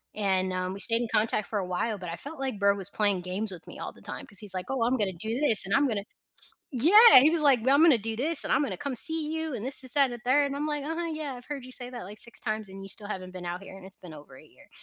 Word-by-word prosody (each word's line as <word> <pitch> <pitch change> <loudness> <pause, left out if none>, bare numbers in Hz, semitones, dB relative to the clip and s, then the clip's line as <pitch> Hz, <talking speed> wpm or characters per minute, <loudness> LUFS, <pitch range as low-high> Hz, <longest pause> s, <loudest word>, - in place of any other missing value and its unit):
and, 190 -3 0
um, 185 0 -3
we 195 - -9
stayed 230 0 +2
in 235 - -3
contact 215 -1 0
for 210 - -3
a 185 - -4
while, 205 +4 -2
but 180 -3 -8
I 165 - -5
felt 285 - -5
like 260 -6 -4
Bro 200 0 +3
was 195 -1 -3
playing 205 -4 0
games 190 +3 -2
with 175 - -13
me - - -11
all - - -7
the - - -20
time - - -8
'cause 200 0 -2
he's 205 -3 -1
like, 180 - -5
"Oh, 265 -3 -2
I'm 250 +3 +1
gonna 200 -4 -2
do 220 +9 -5
this 225 -10 +8
and 195 - -3
I'm 280 0 +3
gonna" 205 -4 -3 0.7
Yeah, 340 - +7
he 300 +4 +4
was 330 -2 0
like, 270 -5 +4
"Well, 270 +2 +3
I'm 310 - +4
gonna 315 -7 +6
do 220 +1 -5
this 305 +5 +3
and - - -2
I'm 285 - +2
gonna 280 - -4
come 280 -3 -5
see 320 0 -1
you 320 -3 -4
and 215 - -6
this 265 +1 +4
and 255 - -1
that 275 -3 +3
and - - -5
the 240 - -8
3." 285 +3 +2
And 280 0 -5
I'm 300 +2 -3
like, 295 -2 -3
"Uh-huh, 330 +2 -4
yeah, 300 -4 -5
I've 245 0 -12
heard 285 -3 -7
you 255 - -11
say 245 -1 -4
that 245 -1 -8
like 205 +2 -10
6 235 - -2
times 215 -3 -4
and 195 0 -11
you 195 - -9
still 205 +1 0
haven't 185 -3 -6
been 180 -1 -9
out 175 +2 -5
here 190 0 -12
and 190 - -13
it's 190 - -7
been 175 -3 -13
over 145 -3 -14
a - - -16
year." - - -22
230 Hz, 330 wpm, -27 LUFS, 195-280 Hz, 0.7 s, this